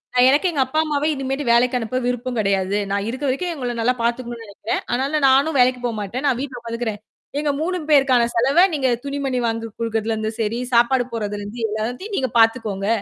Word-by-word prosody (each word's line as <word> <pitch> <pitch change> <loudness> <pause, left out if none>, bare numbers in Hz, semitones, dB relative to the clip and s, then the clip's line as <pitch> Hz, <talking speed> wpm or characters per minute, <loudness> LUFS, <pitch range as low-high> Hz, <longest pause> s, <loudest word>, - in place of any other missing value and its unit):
நான் 250 - +6
எனக்கே 295 +7 +3
எங்க 275 -4 +2
அப்பா 310 +5 -1
அம்மாவே 300 -1 0
இனிமேட்டு 270 0 -2
வேலைக்கு 245 +2 +4
அனுப்ப 240 +2 -3
விருப்பம் 245 0 -2
கிடையாது. 195 -1 +1
நான் 200 +1 0
இருக்கிற 260 +4 -3
வரைக்கும் 345 +7 -1
அவுங்கள 250 -6 -4
நல்லா 245 +3 +2
பாத்துக்கணுன்னு 235 -1 -2
நினைக்கிறேன். 205 +1 -4
ஆனாலும் 275 +4 0
நானும் 275 +3 +3
வேலைக்குப் 250 0 +3
போகமாட்டேன். 225 +2 -3
நான் 260 -4 +2
வீட்ல 265 -2 -5
உக்காந்துக்கிறேன். 230 -2 -4 0.4
எங்க 295 -1 0
3 365 +3 -1
பேருக்கான 270 -4 +5
செலவ 275 +10 +5
நீங்கத் 260 -4 0
துணிமணி 275 -2 -2
வாங்கிக் 225 -1 -4
கொடுக்குறதுல 225 -1 -1
இருந்து 220 0 -2
சரி 225 +2 -1
சாப்பாடு 240 +2 +4
போடுறதுல 205 -2 -3
இருந்து 205 +4 -7
எல்லாத்தையும் 245 - -4
நீங்கப் 260 -3 -1
பாத்துக்கோங்க. 225 -4 +2
245 Hz, 185 wpm, -21 LUFS, 225-270 Hz, 0.4 s, நான்